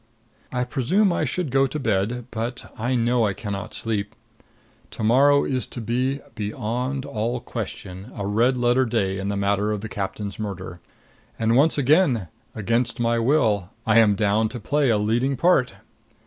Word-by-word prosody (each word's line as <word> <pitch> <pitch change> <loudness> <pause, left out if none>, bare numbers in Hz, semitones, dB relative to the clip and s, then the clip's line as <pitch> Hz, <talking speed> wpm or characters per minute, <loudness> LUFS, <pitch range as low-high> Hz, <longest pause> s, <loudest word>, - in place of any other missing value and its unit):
I 125 -1 0
presume 175 - +1
I 155 - 0
should 150 +1 -2
go 135 +1 +3
to 135 - -5
bed; 115 0 -1
but 120 +3 -5
I 120 +3 -1
know 120 0 +2
I 100 - -1
can 100 +1 -5
not 100 +2 -6
sleep. 105 -3 -3 0.7
To - - -6
morrow 140 +6 +5
is 130 -2 -2
to - - -7
be, 125 +5 -1
beyond 120 +5 -3
all 115 +3 -2
question, 100 -3 -7
a 100 - -4
red 115 +6 +2
letter 125 +2 +3
day 100 -5 -1
in 95 - -3
the 100 0 -1
matter 100 +1 +1
of 105 -2 -2
the 110 - -6
captain's 100 0 -5
murder. 95 -4 -5 0.6
And 115 0 +2
once 150 +5 +4
again, 135 - +3 0.3
against 115 +3 0
my 115 0 +1
will, 115 - +2 0.2
I 110 0 +5
am 105 -3 +5
down 105 +2 +2
to 120 - -7
play 145 +4 +1
a 110 - +3
leading 120 +6 0
part. 170 -7 +3
115 Hz, 175 wpm, -23 LUFS, 105-130 Hz, 0.7 s, morrow